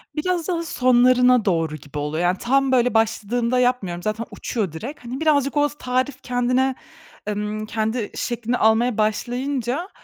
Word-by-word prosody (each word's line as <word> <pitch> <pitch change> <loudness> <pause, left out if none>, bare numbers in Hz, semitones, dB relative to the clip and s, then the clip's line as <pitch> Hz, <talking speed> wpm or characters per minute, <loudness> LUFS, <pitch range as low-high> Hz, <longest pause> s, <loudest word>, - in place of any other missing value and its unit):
Biraz 345 +2 -1
daha 340 -2 -1
sonlarına 250 -4 +4
doğru 165 -4 0
gibi 145 -1 -10
oluyor. 150 +3 -2
Yani 180 +2 +2
tam 270 +5 +1
böyle, 250 -2 +3
başladığında 230 +2 +1
yapmıyorum, 210 -9 0
zaten 215 +3 -2
uçuyor 210 -8 -3
direkt. 240 - -8
Hani 250 +3 -5
birazcık, 290 -3 +2
o 290 0 +3
tarif 255 +2 -1
kendine, 250 +1 +1 0.5
emm, 210 +1 -3
kendi 220 +1 -2
şeklini 240 0 -2
almaya 220 +1 +3
başlayınca, 250 - -1
245 Hz, 145 wpm, -22 LUFS, 215-260 Hz, 0.5 s, sonlarına